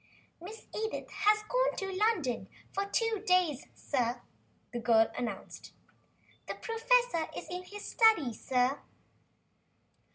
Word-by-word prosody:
"Miss 425 +6 -9
Edith 440 0 -3
has 420 +2 +3
gone - - +1
to 390 -1 -3
London 370 - 0 0.2
for 395 +1 0
two 450 0 0
days, 360 - +2
sir," 245 -3 -1 0.5
the 240 - -2
girl 225 -1 +4
announced. 225 -6 -6 0.7
"The - - -4
professor 455 -6 +1
is - - -6
in 360 0 -3
his 415 +2 -9
study, 435 - +4
sir." 255 +4 0
370 Hz, 120 wpm, -31 LUFS, -, 0.7 s, girl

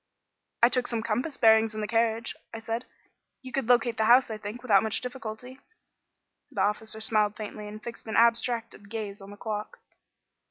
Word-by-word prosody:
"I 235 - +8
took 250 0 +1
some 230 -2 -1
compass 245 +6 -1
bearings 220 -1 +5
in 215 - -3
the 210 - -2
carriage," 225 +1 +1 0.2
I - - -6
said. 225 +2 -4 0.6
"You 260 - -8
could 255 -1 -2
locate 240 -1 +3
the 220 - +2
house, 245 +1 +6
I 215 - -5
think, 215 +4 -7
without 205 -6 +5
much 220 -1 0
difficulty." 250 0 -7 0.9
The - - -2
officer 220 +1 -1
smiled 215 -1 +1
faintly 210 -1 -7
and 215 +1 -9
fixed 235 -1 -8
an 220 - -3
abstracted 230 -3 +1
gaze 210 -2 -5
on 195 - -11
the 205 - -11
clock. 210 0 -5
225 Hz, 185 wpm, -28 LUFS, 215-240 Hz, 0.9 s, I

